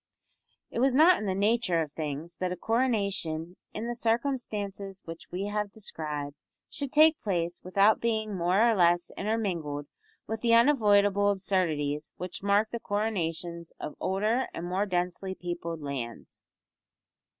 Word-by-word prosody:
It - - -3
was 260 +1 +3
not 335 +5 +7
in 210 - -3
the 190 - 0
nature 200 -3 +2
of 155 -3 -2
things 155 +2 -5
that 185 -1 -2
a - - -1
coronation 200 -8 0 0.2
in 215 - -5
the 240 - -2
circumstances 225 -5 -2
which 165 0 -9
we 185 +3 -3
have 205 0 -2
described 150 -8 -5 0.4
should 280 -3 -5
take 310 +1 +5
place 175 -4 -1
without 200 +4 +3
being 220 -3 0
more 185 +6 +3
or 230 - +4
less 175 -3 +3
intermingled 175 -9 -2 0.4
with 220 0 -4
the 230 -1 +4
unavoidable 205 -6 +4
absurdities 160 -7 0
which 180 0 -6
mark 200 +2 +2
the 235 - -3
coronations 175 -6 -2
of - - -5
older 215 +7 +1
and 170 - -4
more 190 +4 0
densely 180 +1 -2
peopled 170 -2 -5
lands. 125 -5 -6
195 Hz, 145 wpm, -29 LUFS, 170-220 Hz, 0.4 s, not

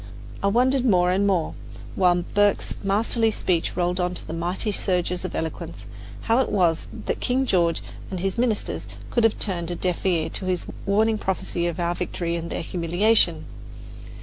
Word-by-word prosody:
I 200 - +2
wondered 250 +5 +3
more 180 -7 +4
and 195 +2 +2
more, 180 -5 +1 0.4
while 175 -2 +3
Burke's 205 0 +2
masterly 220 +3 +2
speech 180 -5 -1
rolled 180 +1 +1
on 180 0 0
in 165 +1 -4
mighty 180 +5 -1
surges 180 -2 0
of - - -4
eloquence, 160 0 -5 0.4
how 230 +2 +2
it 265 - +1
was 175 -5 +2 0.2
that - - -1
King 260 +2 +1
George 170 -7 +2 0.3
and 185 - -4
his 190 +1 -1
ministers 235 -3 -1 0.2
could 235 - +2
have 225 -1 +3
turned 175 -4 -1
a 175 - -2
deaf 180 0 -1
ear 170 -4 +2
to 190 - -5
his 185 -2 -1 0.2
warning 215 +2 +3
prophecy 175 -2 -1
of 175 +1 -3
our 170 0 +1
victory 175 -1 -3
and 170 0 -4
their - - -3
humiliation. 175 0 +2
185 Hz, 175 wpm, -24 LUFS, 175-210 Hz, 0.4 s, more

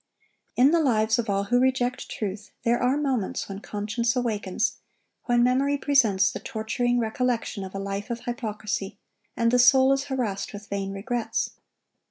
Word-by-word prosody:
In 265 +4 +5
the 335 - +4
lives 225 -6 +2
of 225 - -2
all 200 0 +1
who 245 +5 +2
reject 255 -1 0
truth, 210 0 -5
there 235 +1 +2
are 255 +3 +2
moments 265 -9 -1
when 195 0 -6
conscience 215 +3 -2
awakens, 215 -4 -1 0.5
when 240 -1 +3
memory 270 +3 +2
presents 230 -10 +3
the - - -6
torturing 245 +3 -1
recollection 235 -2 -1
of 190 0 -8
a - - -2
life 200 +2 -4
of 235 0 -4
hypocrisy, 210 -4 -4 0.4
and 230 -1 +2
the 250 - +4
soul 260 +2 +6
is 275 +1 -1
harassed 235 -9 -3
with 205 +1 -9
vain 195 -1 -3
regrets. 225 +4 -2
235 Hz, 165 wpm, -26 LUFS, 205-250 Hz, 0.5 s, soul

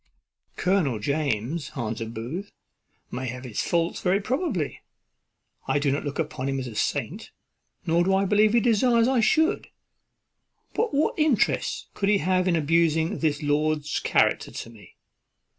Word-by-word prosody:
"Colonel 180 - +1
James," 140 +3 -2
answered 115 -2 -4
Booth, 150 - -5 0.6
"may 130 +1 -4
have 125 +1 -6
his 120 -5 -3
faults 170 -1 0
very 190 +2 +2
probably. 225 - -2 0.9
I - - +2
do 140 -1 +1
not 140 - -1
look 145 - -4
upon 150 -4 -3
him 135 - -1
as 130 - -4
a 120 - -7
saint, - - -2 0.6
nor 170 +1 +3
do 190 +2 +2
I 195 +1 +2
believe 210 +2 +3
he 235 - +4
desires 235 +1 +3
I 260 -1 +2
should; 315 - +2 1.1
but 455 0 0
what 290 +3 0
interest 300 -8 +1
could 195 - -1
he 210 - +4
have 185 +1 +1
in 175 - +3
abusing 165 +2 +1
this 155 -1 0
lord's 150 0 0
character - - +1
to - - -7
me? 110 -3 -17
165 Hz, 155 wpm, -25 LUFS, 140-205 Hz, 1.1 s, he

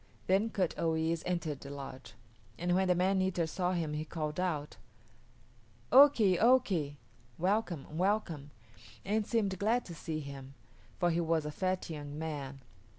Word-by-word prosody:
'" - - -30
Then 195 +4 +2
Kut 190 -5 0
o 165 -1 +1
yis´ 160 +1 0
entered 170 -5 -2
the 140 - -9
lodge, 135 -2 -8 0.4
and 175 +1 0
when 190 +1 +2
the 180 - +4
man 190 +2 +2
eater 185 -3 +1
saw 180 +3 -1
him 165 -4 -1
he 150 +1 -2
called 155 0 -4
out, 155 -5 -2 1.1
"Oki, 245 -10 +7
oki!" 195 - +3 0.4
(welcome, 180 -4 0
welcome!) 180 -7 0 0.6
and 210 +1 0
seemed 200 -5 0
glad 230 +4 +1
to 175 - -8
see 155 0 -4
him, 140 -2 -9 0.4
for 175 -1 +2
he 170 +1 +1
was 165 -2 +1
a 150 - -3
fat 185 +3 -1
young 145 -1 -6
man. 145 -4 -5
170 Hz, 160 wpm, -32 LUFS, 150-190 Hz, 1.1 s, Oki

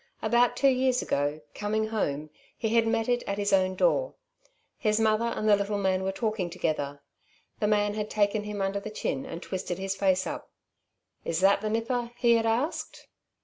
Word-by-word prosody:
About 235 +2 +3
two 275 - +4
years 255 -1 +2
ago, 145 +2 -1
coming 215 +1 -1
home, 150 -9 -2 0.3
he 220 - -1
had 230 0 +3
met 225 0 +1
it 245 -1 +1
at 200 - -2
his 200 -1 0
own 185 -1 +3
door. - - +1 0.6
His 215 -1 +2
mother 220 +1 +2
and 230 -2 -2
the 210 - +7
little 200 +1 -1
man 190 -1 +1
were 190 0 -1
talking 215 -3 -2
together. 145 -5 -2 0.6
The 210 - +1
man 205 -1 +2
had 210 0 -3
taken 205 0 +1
him 205 -1 -3
under 195 +1 -1
the 200 - -7
chin 140 -10 -3
and 170 - -7
twisted 185 -2 -4
his 195 0 -2
face 190 -1 +2
up. - - -6 0.7
"Is 165 -1 -1
that 195 +1 +4
the 215 - -2
nipper?" 235 +2 -1
he 235 -2 +4
had 225 -1 +2
asked. 245 +8 -2
210 Hz, 190 wpm, -28 LUFS, 190-225 Hz, 0.7 s, the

